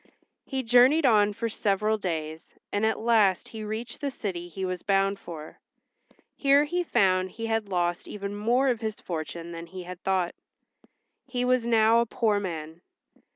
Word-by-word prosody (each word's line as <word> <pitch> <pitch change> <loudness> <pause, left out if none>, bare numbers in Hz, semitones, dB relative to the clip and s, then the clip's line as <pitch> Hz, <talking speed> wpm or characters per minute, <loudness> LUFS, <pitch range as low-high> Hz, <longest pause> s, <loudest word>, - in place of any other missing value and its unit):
He 265 -2 -2
journeyed 250 +6 +5
on 210 -4 +5
for 225 +3 -3
several 215 0 0
days, 160 -4 -5 0.2
and 205 +2 +1
at 220 - 0
last 215 -5 +2
he 220 -1 -7
reached 220 +5 -5
the 285 - -1
city 185 -9 -5
he 190 +2 -5
was 185 -1 -3
bound 195 -1 +1
for. 160 -5 -9 0.8
Here 280 +1 +4
he 350 +4 -1
found 185 - +2
he 225 +4 -6
had 225 -2 -1
lost 175 -2 -1
even 200 0 -5
more 240 +6 +2
of 240 -2 -1
his 220 -1 -3
fortune 170 0 -5
than 170 0 -7
he 185 +1 -8
had 180 0 -9
thought. 185 -2 0 0.9
He 250 -1 -1
was 250 -2 +2
now 225 0 +5
a 235 - +1
poor 215 -2 +1
man. 165 -3 -6
210 Hz, 170 wpm, -27 LUFS, 180-235 Hz, 0.9 s, journeyed